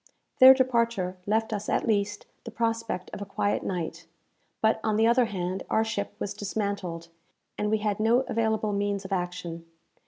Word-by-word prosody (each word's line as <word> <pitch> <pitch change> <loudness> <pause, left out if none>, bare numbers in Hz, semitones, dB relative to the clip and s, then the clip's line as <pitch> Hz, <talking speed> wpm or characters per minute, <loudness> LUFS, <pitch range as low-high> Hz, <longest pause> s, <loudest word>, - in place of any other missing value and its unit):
Their 260 +1 +10
departure 235 -8 +1
left 220 +1 +1
us 210 0 -3
at - - +1
least 205 -2 0 0.2
the - - -7
prospect 230 -4 -2
of - - -6
a - - -3
quiet 205 +1 0
night; 170 -2 -4 0.5
but, 220 0 +2
on 215 - +1
the 220 +1 +3
other 240 +2 +4
hand, 185 -3 -3
our 220 - +3
ship 215 -2 -3
was 200 - -4
dismantled, 200 -5 -4 0.5
and 210 - -1
we 220 - +2
had 210 -1 -1
no 230 +3 +4
available 220 -4 0
means 200 -1 -1
of 190 - -8
action. 175 -2 -4
210 Hz, 175 wpm, -27 LUFS, 190-225 Hz, 0.5 s, Their